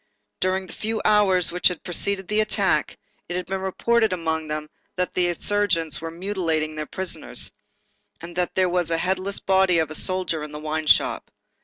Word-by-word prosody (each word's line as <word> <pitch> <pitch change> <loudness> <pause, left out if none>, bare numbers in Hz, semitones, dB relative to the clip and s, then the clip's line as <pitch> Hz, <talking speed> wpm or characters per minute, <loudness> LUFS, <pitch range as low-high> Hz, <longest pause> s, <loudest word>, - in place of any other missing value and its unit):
During 185 +1 0
the 180 - -10
few 220 0 -2
hours 195 -4 +4
which 180 +1 +4
had 180 - -2
preceded 190 +1 -1
the 210 0 +1
attack, 215 - +1 0.3
it 175 - -2
had 180 0 -2
been 190 +1 -3
reported 220 +3 +2
among 160 -3 -1
them 150 0 -3 0.3
that 180 0 -1
the 180 -1 +2
insurgents 175 -3 0
were 165 - -4
mutilating 165 -3 -2
their 155 -1 -5
prisoners, 180 - -5 0.7
and 170 +1 -9
that 180 0 -1
there 185 -1 +3
was 180 -1 +1
the 165 - +1
headless 190 +3 -1
body 190 -2 +3
of 160 -2 0
a - - -3
soldier 180 -1 0
in 150 0 -8
the 150 - -5
wine 155 0 -3
shop. - - +3
180 Hz, 185 wpm, -24 LUFS, 160-190 Hz, 0.7 s, hours